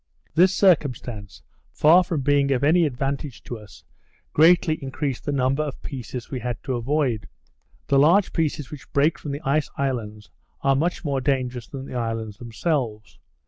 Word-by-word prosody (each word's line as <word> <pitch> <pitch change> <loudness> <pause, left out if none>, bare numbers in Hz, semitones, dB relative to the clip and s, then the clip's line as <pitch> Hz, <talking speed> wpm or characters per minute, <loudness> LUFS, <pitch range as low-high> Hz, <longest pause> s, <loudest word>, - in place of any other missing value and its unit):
This 180 +4 +5
circumstance, 125 - 0 0.3
far 170 +5 +5
from 165 -4 -2
being 140 0 +2
of 130 0 +1
any 165 +3 +4
advantage 135 -1 -4
to 120 - -6
us, 105 -2 -15 0.5
greatly 160 -1 +4
increased 135 -1 -3
the 145 - -1
number 135 +1 +1
of 150 -4 -4
pieces 125 -1 -7
we 130 - -3
had 120 -1 -3
to 135 - -2
avoid. 125 -1 -1 0.6
The 140 - +3
large 175 +7 +4
pieces 150 -4 -1
which 150 - -10
break 150 +2 +2
from 145 - -6
the 140 +2 -4
ice 150 -1 0
islands, 110 -6 -3 0.3
are 135 0 +3
much 170 +5 -1
more 140 -2 0
dangerous 130 -3 -1
than 135 -1 -7
the - - -9
islands 115 -3 -3
themselves. 115 - -3
135 Hz, 165 wpm, -24 LUFS, 120-150 Hz, 0.6 s, This